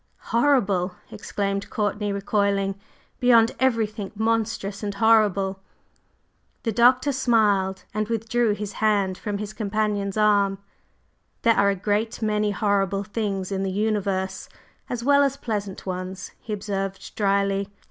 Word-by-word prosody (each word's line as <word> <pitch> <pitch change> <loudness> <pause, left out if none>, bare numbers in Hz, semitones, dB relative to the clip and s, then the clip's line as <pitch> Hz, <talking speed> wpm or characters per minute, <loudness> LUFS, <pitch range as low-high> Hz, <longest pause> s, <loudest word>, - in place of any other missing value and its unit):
"Horrible!" 205 -9 +2 0.2
exclaimed 200 0 -3
Courtney, 205 -1 -1
recoiling. 200 0 0 0.5
"Beyond 235 -2 +5
everything 220 -5 0
monstrous 220 -2 -1
and 205 -2 -3
horrible!" 200 -3 +3 1.0
The 225 - 0
Doctor 250 +5 +4
smiled 210 -7 +2
and 215 0 -1
withdrew 230 0 0
his 210 -1 -5
hand 205 -3 +1
from 205 +1 -4
his 210 +1 -6
companion's 210 -2 -1
arm. 205 -2 +3 0.9
"There 230 - +5
are 200 - +4
a 200 - +1
great 210 +4 -1
many 210 -1 +1
horrible 200 -1 0
things 200 -2 -3
in 195 -1 -1
the 195 - -1
universe 200 -2 -1 0.4
as 240 -1 -3
well 285 +2 +5
as 275 -1 +1
pleasant 205 -6 -4
ones," 185 0 -5
he 220 - -9
observed 195 -2 -4
dryly. 200 -1 +1
205 Hz, 125 wpm, -24 LUFS, 195-225 Hz, 1.0 s, Beyond